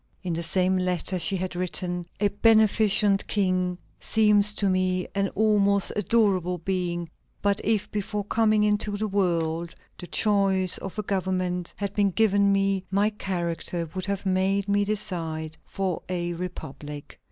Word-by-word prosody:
In 180 Hz, -2 st, -2 dB
the 165 Hz, -, -2 dB
same 185 Hz, +2 st, +2 dB
letter 180 Hz, 0 st, -1 dB
she 185 Hz, +3 st, 0 dB
had 185 Hz, 0 st, -4 dB
written: 175 Hz, -1 st, -2 dB
"A 205 Hz, 0 st, +3 dB
beneficent 210 Hz, -1 st, +3 dB
king 185 Hz, -3 st, +1 dB, 0.2 s
seems 210 Hz, -2 st, +3 dB
to 200 Hz, -, 0 dB
me 185 Hz, -1 st, +1 dB
an 200 Hz, 0 st, 0 dB
almost 200 Hz, -2 st, +2 dB
adorable 195 Hz, -4 st, +1 dB
being; 175 Hz, -1 st, -2 dB, 0.4 s
but 200 Hz, 0 st, +1 dB
if, 220 Hz, -3 st, 0 dB
before 205 Hz, 0 st, -3 dB
coming 215 Hz, 0 st, +2 dB
into 210 Hz, 0 st, 0 dB
the 215 Hz, +1 st, -1 dB
world, 170 Hz, -4 st, -1 dB, 0.2 s
the 180 Hz, -, -8 dB
choice 195 Hz, -3 st, +2 dB
of 195 Hz, +2 st, -7 dB
a 215 Hz, -, -2 dB
government 185 Hz, -2 st, -2 dB
had 200 Hz, -1 st, -3 dB
been 205 Hz, -1 st, +2 dB
given 200 Hz, 0 st, +3 dB
me, 195 Hz, -1 st, +1 dB
my 200 Hz, +3 st, +2 dB
character 175 Hz, -4 st, -3 dB
would 185 Hz, 0 st, -4 dB
have 200 Hz, 0 st, -3 dB
made 190 Hz, +1 st, +1 dB
me 205 Hz, 0 st, +2 dB
decide 165 Hz, -6 st, -3 dB
for 190 Hz, -3 st, -2 dB
a 175 Hz, -1 st, -2 dB
republic." 150 Hz, -4 st, -8 dB
190 Hz, 150 wpm, -26 LUFS, 180-205 Hz, 0.4 s, A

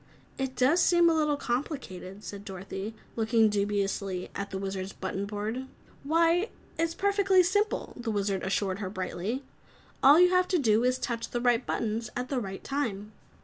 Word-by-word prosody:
"It 265 Hz, -1 st, -2 dB
does 285 Hz, +9 st, +4 dB
seem 345 Hz, -1 st, +5 dB
a -, -, +3 dB
little 300 Hz, -2 st, +2 dB
complicated," 240 Hz, -, -4 dB
said 200 Hz, 0 st, -7 dB
Dorothy, 195 Hz, +2 st, -6 dB, 0.2 s
looking 225 Hz, -1 st, +3 dB
dubiously 200 Hz, -2 st, -1 dB
at 200 Hz, 0 st, -4 dB
the 190 Hz, -, -4 dB
Wizard's 190 Hz, 0 st, -4 dB
button 190 Hz, +1 st, -4 dB
board. 215 Hz, +5 st, -4 dB, 0.4 s
"Why, 335 Hz, +6 st, +3 dB, 0.3 s
it's 330 Hz, +1 st, -1 dB
perfectly 395 Hz, -2 st, +4 dB
simple!" 410 Hz, +4 st, 0 dB
the 240 Hz, -2 st, -5 dB
Wizard 200 Hz, -2 st, 0 dB
assured 195 Hz, 0 st, -1 dB
her 195 Hz, -3 st, -3 dB
brightly. 190 Hz, +6 st, -3 dB, 0.6 s
"All 285 Hz, +4 st, +8 dB
you 360 Hz, 0 st, +6 dB
have 365 Hz, 0 st, +3 dB
to 365 Hz, -, +2 dB
do 225 Hz, -6 st, +3 dB
is 250 Hz, +1 st, +2 dB
touch 235 Hz, -2 st, -3 dB
the 240 Hz, -, -2 dB
right 245 Hz, 0 st, +2 dB
buttons 225 Hz, 0 st, -2 dB
at 250 Hz, +1 st, -3 dB
the 270 Hz, -, 0 dB
right 195 Hz, -4 st, -6 dB
time!" 220 Hz, -7 st, -3 dB
230 Hz, 170 wpm, -29 LUFS, 200-295 Hz, 0.6 s, All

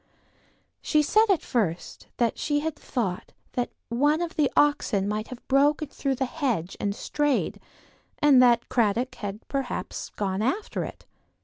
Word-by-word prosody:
She 305 Hz, -1 st, +2 dB
said 435 Hz, +8 st, +4 dB
at 375 Hz, -6 st, +3 dB
first 185 Hz, -9 st, -2 dB
that 235 Hz, -2 st, +1 dB
she 290 Hz, -1 st, 0 dB
had 320 Hz, 0 st, -2 dB
thought 195 Hz, -8 st, -3 dB, 0.2 s
that 245 Hz, -1 st, -1 dB, 0.2 s
one 290 Hz, +7 st, +2 dB
of 345 Hz, -1 st, -3 dB
the 295 Hz, -4 st, +2 dB
oxen 280 Hz, -9 st, +3 dB
might 215 Hz, +1 st, -2 dB
have 250 Hz, -1 st, -10 dB
broken 290 Hz, +2 st, +3 dB
through 275 Hz, -2 st, -2 dB
the 265 Hz, -, -1 dB
hedge 250 Hz, -, -2 dB
and 200 Hz, -1 st, -1 dB
strayed, 295 Hz, +2 st, 0 dB, 0.6 s
and 280 Hz, -4 st, +6 dB
that 240 Hz, -1 st, +4 dB
Cradock 235 Hz, +2 st, +1 dB
had 205 Hz, 0 st, -7 dB
perhaps 275 Hz, -2 st, -4 dB
gone 195 Hz, -1 st, -1 dB
after 275 Hz, -, -1 dB
it. -, -, -9 dB
255 Hz, 150 wpm, -26 LUFS, 215-295 Hz, 0.6 s, and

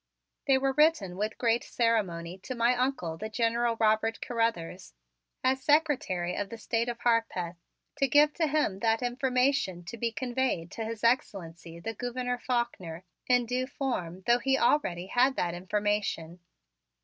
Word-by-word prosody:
They 270 Hz, -1 st, +5 dB
were 270 Hz, 0 st, +1 dB
written 300 Hz, -, +3 dB
with 210 Hz, +3 st, -3 dB
great 235 Hz, -1 st, +1 dB
ceremony 190 Hz, -7 st, -1 dB
to 255 Hz, +7 st, -6 dB
my 235 Hz, +1 st, +3 dB
Uncle, 245 Hz, -11 st, -1 dB
the 215 Hz, -, -4 dB
General 230 Hz, +1 st, +1 dB
Robert 220 Hz, +1 st, +2 dB
Carruthers, 210 Hz, -, -2 dB, 0.5 s
as 260 Hz, +1 st, +2 dB
Secretary 275 Hz, -, +1 dB
of 200 Hz, -1 st, -3 dB
the 230 Hz, -, -7 dB
State 230 Hz, +1 st, -1 dB
of 240 Hz, -, -4 dB
Harpeth, 225 Hz, -7 st, 0 dB, 0.4 s
to 275 Hz, -1 st, +2 dB
give 295 Hz, +3 st, +5 dB
to 325 Hz, -2 st, +1 dB
him 290 Hz, -10 st, 0 dB
that 225 Hz, +2 st, +1 dB
information 250 Hz, -6 st, +1 dB
to 235 Hz, -, -7 dB
be 230 Hz, +1 st, -1 dB
conveyed 240 Hz, -7 st, -2 dB
to 225 Hz, -, -4 dB
His 225 Hz, 0 st, -6 dB
Excellency, 170 Hz, -8 st, -1 dB
the 225 Hz, +7 st, -4 dB
Gouverneur 245 Hz, +2 st, -3 dB
Faulkner, 190 Hz, -10 st, -2 dB, 0.2 s
in 245 Hz, -1 st, +3 dB
due 250 Hz, +2 st, -1 dB
form 190 Hz, -11 st, -4 dB
though 240 Hz, +1 st, +4 dB
he 270 Hz, +2 st, +2 dB
already 190 Hz, -11 st, +1 dB
had 250 Hz, +7 st, +2 dB
that 175 Hz, -1 st, -1 dB
information. 190 Hz, -2 st, -2 dB
230 Hz, 155 wpm, -29 LUFS, 190-255 Hz, 0.5 s, They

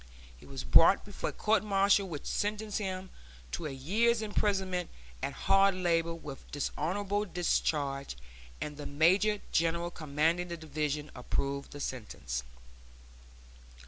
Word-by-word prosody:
He -, -, -16 dB
was -, -, -6 dB
brought 65 Hz, -, +6 dB
before -, -, -4 dB
a -, -, -5 dB
court 215 Hz, 0 st, +2 dB
martial 200 Hz, -1 st, +3 dB
which 150 Hz, -4 st, -6 dB
sentenced 210 Hz, 0 st, -1 dB
him 190 Hz, -2 st, -4 dB, 0.4 s
to 160 Hz, -, -3 dB
a -, -, -4 dB
year's 215 Hz, -, +1 dB
imprisonment 190 Hz, -4 st, 0 dB, 0.3 s
at -, -, -1 dB
hard 195 Hz, 0 st, +5 dB
labor 170 Hz, -2 st, +1 dB
with 145 Hz, -4 st, -9 dB
dishonorable 190 Hz, +8 st, -1 dB
discharge, 145 Hz, -, -1 dB, 0.4 s
and 150 Hz, -1 st, -5 dB
the 150 Hz, -, -5 dB
major 190 Hz, +8 st, +3 dB
general 170 Hz, +1 st, +1 dB
commanding 160 Hz, +3 st, 0 dB
the 170 Hz, -1 st, -5 dB
division 150 Hz, -1 st, -3 dB
approved 140 Hz, +2 st, -2 dB
the 145 Hz, -, -9 dB
sentence. 105 Hz, -, -4 dB
170 Hz, 130 wpm, -31 LUFS, 145-195 Hz, 0.4 s, brought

